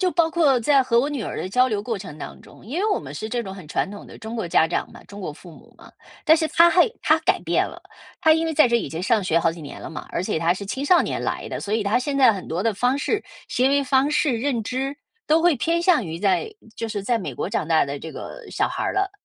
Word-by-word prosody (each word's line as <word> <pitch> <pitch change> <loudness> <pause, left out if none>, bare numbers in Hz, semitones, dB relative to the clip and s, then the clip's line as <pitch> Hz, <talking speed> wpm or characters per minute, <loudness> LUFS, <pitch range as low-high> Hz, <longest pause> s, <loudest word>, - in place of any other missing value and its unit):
就 370 -1 +2
包 335 -2 +2
括 310 -6 +3
在 275 +3 +4
和 235 -2 +2
我 275 - +2
女 285 -6 -3
儿 - - -5
的 185 - -3
交 250 +5 +3
流 210 -3 -1
过 225 0 -3
程 170 -6 -9
当 - - -8
中， - - -17
因 310 +10 -3
为 430 +1 +1
我 400 - +2
们 - - -9
是 220 - -5
这 240 0 -2
种 190 -1 -7
很 185 -6 -11
传 - - -1
统 205 - -9
的 - - -13
中 225 +1 -7
国 220 -7 -3
家 160 - +4
长 170 - -2
嘛、 - - -14
中 200 0 -11
国 180 - -5
父 170 +3 -14
母 - - -17
嘛， - - -15 0.3
但 320 +1 +6
是 315 -1 0
她 335 +1 +6
还 360 +7 +4
她 - - +4
改 - - +1
变 - - +1
了。 - - -9 0.4
她 315 - +5
因 320 +1 +2
为 320 - -1
在 305 -3 +5
这 235 - 0
已 230 - -2
经 160 +3 -5
上 215 +1 +2
学 170 -2 +2
好 165 -1 +1
几 165 -1 -10
年 145 - -9
了 - - -7
嘛， 160 - -7
而 - - -2
且 180 - -2
她 165 +2 +2
是 195 +2 -7
青 265 +7 -3
少 355 +4 +5
年 - - -2
来 - - -3
的， - - -5
所 205 - -4
以 220 -2 +1
她 200 - +2
现 275 +2 -1
在 255 -4 +6
很 195 -3 -7
多 170 +3 -2
的 225 0 0
方 250 +6 +1
式 420 +7 -1 0.2
行 255 +2 +1
为 280 0 +2
方 270 +2 +2
式、 290 -5 +1
认 235 -2 -1
知， 270 +4 -3 0.3
都 315 +2 +4
会 345 -2 +4
偏 335 +6 0
向 340 - +3
于 165 0 -5
在 205 - +1 0.2
就 230 - -4
是 205 -3 -4
在 235 0 +1
美 190 - -5
国 - - -4
长 165 -5 -2
大 160 -1 +4
的 140 0 -5
这 160 - -7
个 - - -9
小 - - +1
孩 - - -4
儿 - - -1
了。 390 0 0
235 Hz, 320 characters per minute, -23 LUFS, 190-295 Hz, 0.4 s, 但